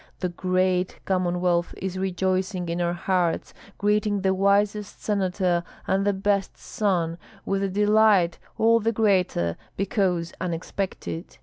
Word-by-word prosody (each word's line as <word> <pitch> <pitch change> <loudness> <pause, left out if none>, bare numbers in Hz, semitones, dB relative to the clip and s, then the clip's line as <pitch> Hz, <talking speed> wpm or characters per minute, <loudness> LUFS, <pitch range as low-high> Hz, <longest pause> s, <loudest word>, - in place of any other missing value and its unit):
The 180 -2 -2
whole 185 0 +1
Commonwealth 180 -2 0
is 190 -1 -4
rejoicing 185 -1 -1
in 170 +1 -1
our 170 0 +1
hearts, 175 -1 0 0.2
greeting 210 0 +1
the 190 0 +2
wisest 200 +2 +1
senator 185 -4 0 0.2
and 195 +2 +1
the - - +5
best 200 0 0
son, 175 -7 -1 0.3
with 195 0 0
a 195 - 0
delight 205 -3 +3 0.2
all 230 +1 +4
the 225 +1 +1
greater 185 - +1 0.2
because 185 -4 0
unexpected. 180 0 -4
190 Hz, 125 wpm, -25 LUFS, 180-200 Hz, 0.3 s, the